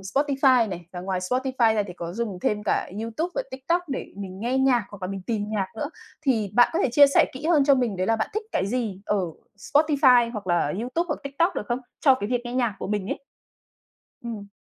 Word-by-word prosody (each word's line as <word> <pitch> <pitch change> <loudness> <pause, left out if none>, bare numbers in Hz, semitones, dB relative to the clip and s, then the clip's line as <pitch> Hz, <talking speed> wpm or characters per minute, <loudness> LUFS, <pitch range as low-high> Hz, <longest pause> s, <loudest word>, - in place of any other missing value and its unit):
Spotify 265 +2 +2
này, 175 -3 -7
và 180 - -6
ngoài 185 0 -2
Spotify 250 +2 +1
ra 210 - +2
thì 180 - -7
có 170 -1 -6
dùng 215 -2 -3
thêm 210 +2 0
cả - - 0
Youtube 230 +10 -3
và - - 0
TikTok 275 +7 -1
để 270 - -5
mình 190 -1 -7
nghe 245 +4 0
nhạc 260 -4 +3
hoặc 205 -2 -11
là 185 - -2
mình 195 -1 -5
tìm 220 -3 -1
nhạc 210 -3 -1
nữa. 285 +6 -3 0.3
Thì 225 -9 +1
bạn 245 +1 +6
có 330 - 0
thể - - +2
chia 285 +2 +8
sẻ 280 - +4
kỹ 265 +4 -6
hơn 315 -4 +4
cho 280 0 +6
mình 245 -6 0
đấy 185 +1 -1
là 225 - +2
bạn 220 - -2
thích 430 - -1
cái - - +1
gì 215 -4 -2
ở 210 - +1 0.4
Spotify 270 -3 +4
hoặc 210 -4 -6
là 175 -4 +1
Youtube 255 +9 -1
hoặc 300 - -2
TikTok 280 +6 0
được 210 - -4
không? 240 +2 -1 0.2
Cho 270 -4 +6
cái 205 -5 -4
việc 245 0 0
nghe 240 - -5
nhạc 240 -5 +1
của - - -4
mình 205 -2 -2
ấy. - - -2 1.1
Ừm. 215 -4 -6
235 Hz, 240 wpm, -25 LUFS, 200-270 Hz, 1.1 s, chia